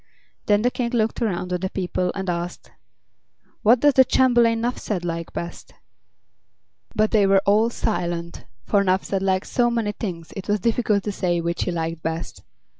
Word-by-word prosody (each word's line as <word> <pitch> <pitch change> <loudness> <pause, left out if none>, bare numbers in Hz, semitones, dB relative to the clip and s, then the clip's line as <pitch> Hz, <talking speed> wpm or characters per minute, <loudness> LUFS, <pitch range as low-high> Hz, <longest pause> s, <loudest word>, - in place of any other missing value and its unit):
Then 205 0 +3
the 245 - +2
King 245 -2 -2
looked 225 0 0
around 180 -5 -1
on 180 - 0
the 190 +1 -2
people 180 -1 -2
and 195 -1 -4
asked: 175 0 -4 0.9
"What 230 +3 +5
does 290 -1 +5
the 260 - +7
Chamberlain 240 -3 +3
Nuphsed 215 -6 -2
like 165 -1 -4
best?" 170 0 -7 1.2
But 215 0 +2
they 210 -3 +4
were 195 0 +4
all 215 +3 +4
silent, 170 -5 -3 0.2
for 200 -1 +2
Nuphsed 190 +1 0
liked 190 0 +1
so 240 -2 +1
many 230 -3 -1
things 175 -6 -6
it 195 0 -7
was 205 0 +1
difficult 215 -2 +1
to 210 - -2
say 175 -3 0
which 170 0 -2
he - - -1
liked 165 -1 -3
best. 165 +1 -4
195 Hz, 175 wpm, -23 LUFS, 175-225 Hz, 1.2 s, the